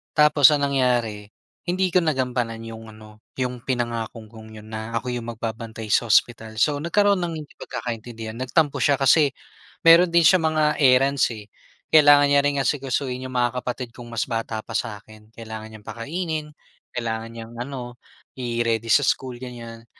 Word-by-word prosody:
tapos 150 -2 +6
ang 145 -1 0
nangyari, 120 -6 0 0.4
hindi 185 +1 +1
ko 180 - +5
nagampanan 125 -6 -1
'yong 115 -1 -9
ano, 110 0 -15 0.2
'yong 125 -1 -2
pinangako 120 -3 -3
kong 110 -1 -13
'yon 110 +1 -13
na 110 +1 -5
ako 125 - -4
'yong 120 -1 -5
magbabantay 115 -1 -6
sa 120 - +2
ospital. 110 0 +2
So 145 +3 +2
nagkaroon 200 +4 +2
ng 170 -1 -3
hindi 145 - -19
pagkakaintindihan, 115 -1 -6
nagtampo 140 +4 +1
siya 145 - +4
kasi 145 +2 +5 0.6
mayro'n 170 +2 +8
din 170 0 +4
siyang 160 -2 +5
mga 155 - +3 0.2
errands, 135 +1 +4
eh. 105 -1 -10 0.5
Kailangan 145 -2 +7
niya 140 0 +5
ring 145 0 +1
asikasuhin 130 -2 -2
'yong 130 - -9
mga 125 +1 0
kapatid 125 -1 -5
kong 120 -1 -10
mas 115 -1 -1
bata 115 -1 -3
pa - - -9
sa'kin. 110 0 -6
Kailangan 110 -1 -8
niyang 105 -1 -13
pakainin, 155 +5 -4 0.5
kailangan 115 -1 -3
niyang 115 0 -9
ano, 125 -1 -6 0.4
i-ready 115 -2 -1
sa 145 - +5
school, 130 -3 -1
ganyan. 115 -2 -9
120 Hz, 160 wpm, -23 LUFS, 115-145 Hz, 0.6 s, mayro'n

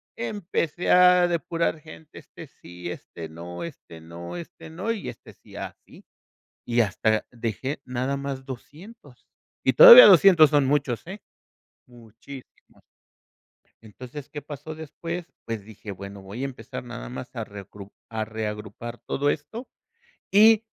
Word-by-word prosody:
empecé 170 - -2
a 180 0 +6
depurar 170 -1 -1
gente, 155 0 -13
este - - -13
sí, 90 0 -10
este 85 -1 -9
no, 85 +2 -8
este 130 - -10
no, 85 - -9
este 170 -1 -11
no, 185 +8 -3
y 225 -3 -4
este 115 - -12
sí, - - -22
y - - -9
así, - - -10 0.6
y 120 0 +2
hasta 110 +1 0
dejé 120 +5 -4
nada 130 +2 -2
más 135 -1 -5
200. 145 - -12 0.4
Y - - +3
todavía - - +12
200 170 -7 +7
son 145 -2 +3
muchos, 135 -4 0
eh, 195 +3 -8 0.7
muchísimos. 120 +3 -15 1.0
Entonces, 125 +6 -10
¿qué 145 - -6
pasó 150 +2 -9
después? 165 +2 -6 0.2
Pues 110 -3 -5
dije: 110 -1 -11
"Bueno, 100 +1 -9
voy 100 +7 -8
a - - 0
empezar 135 -2 -7
nada - - -8
más 65 +2 -9
a - - -5
a - - -3
reucru 100 0 -12 0.2
a 110 -1 -3
reagrupar 110 +1 -6
todo 140 +5 -1
esto 220 - -6 0.7
y 220 +1 +6
130 Hz, 145 wpm, -25 LUFS, 110-165 Hz, 1.0 s, todavía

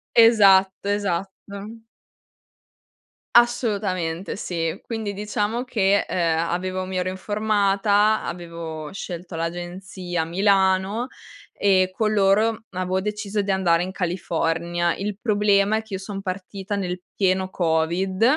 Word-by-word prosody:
Esatto, 200 -4 +5
esatto. 200 +3 -4 1.5
Assolutamente 200 -8 +1
sì. 165 -2 -3
Quindi 220 -3 -3
diciamo 210 +3 -2
che, 200 -5 +2
ehm, 165 -3 +1
avevo 185 +1 -2
mi 185 0 -4
ero 180 0 0
informata, 205 +1 +2
avevo 165 -3 -6
scelto 175 -2 -6
l'agenzia 175 +1 -4
a - - -1
Milano 195 +4 +2 0.4
e 185 -2 +3
con 215 +2 0
loro 215 +3 +2
avevo 185 +1 -1
deciso 210 0 -2
di 200 - -5
andare 175 -3 +3
in 185 +1 -3
California. 170 -1 -1
Il 200 0 -4
problema 210 -1 +3
è - - -2
che 220 -3 -7
io - - -4
son 195 0 -6
partita 195 +1 -5
nel 180 -2 -3
pieno 190 -1 +1
COVID, 175 +4 0
190 Hz, 120 wpm, -23 LUFS, 180-205 Hz, 1.5 s, Esatto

